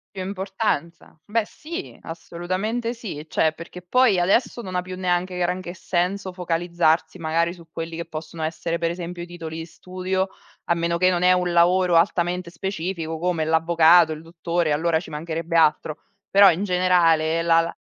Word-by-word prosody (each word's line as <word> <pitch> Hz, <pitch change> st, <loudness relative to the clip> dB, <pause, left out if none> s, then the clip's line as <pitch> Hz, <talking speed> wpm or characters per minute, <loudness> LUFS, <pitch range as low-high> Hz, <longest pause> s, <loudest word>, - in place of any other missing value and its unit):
Più 190 Hz, -, -4 dB
importanza. 190 Hz, -5 st, -3 dB
Beh 225 Hz, +2 st, 0 dB
sì, 335 Hz, -, -8 dB
assolutamente 185 Hz, +8 st, -3 dB
sì. 195 Hz, -11 st, -7 dB
Cioè 160 Hz, 0 st, +2 dB
perché 170 Hz, +3 st, -10 dB
poi 220 Hz, +3 st, +3 dB
adesso 225 Hz, +7 st, +1 dB
non 185 Hz, -4 st, -7 dB
ha 180 Hz, -, +1 dB
più 185 Hz, +1 st, -7 dB
neanche 180 Hz, 0 st, -1 dB
granché 180 Hz, 0 st, -2 dB
senso 185 Hz, +2 st, -2 dB
focalizzarsi 170 Hz, -1 st, 0 dB
magari 165 Hz, +1 st, 0 dB
su 170 Hz, -2 st, -15 dB
quelli 165 Hz, 0 st, -6 dB
che 170 Hz, -, -4 dB
possono 160 Hz, 0 st, -8 dB
essere 165 Hz, +1 st, -2 dB
per 170 Hz, 0 st, -1 dB
esempio 175 Hz, 0 st, -6 dB
i -, -, -6 dB
titoli 165 Hz, -2 st, -7 dB
di 165 Hz, -, -5 dB
studio, 185 Hz, +2 st, -3 dB, 0.4 s
a -, -, +5 dB
meno 170 Hz, 0 st, -1 dB
che 185 Hz, +1 st, +4 dB
non 175 Hz, -1 st, 0 dB
è 180 Hz, 0 st, +6 dB
un 180 Hz, -1 st, 0 dB
lavoro 175 Hz, +1 st, +4 dB
altamente 175 Hz, 0 st, +1 dB
specifico 170 Hz, -2 st, -4 dB
come 175 Hz, -2 st, 0 dB
l'avvocato, 165 Hz, +1 st, +5 dB
il 155 Hz, -, -9 dB
dottore, 165 Hz, 0 st, -2 dB
allora 160 Hz, +2 st, +1 dB
ci -, -, -11 dB
mancherebbe 165 Hz, +2 st, -3 dB
altro. 155 Hz, -1 st, +2 dB, 0.3 s
Però 200 Hz, 0 st, +7 dB
in 180 Hz, +3 st, 0 dB
generale 170 Hz, -4 st, +3 dB
la 165 Hz, 0 st, +4 dB
la 165 Hz, 0 st, -2 dB
175 Hz, 170 wpm, -23 LUFS, 165-185 Hz, 0.4 s, Però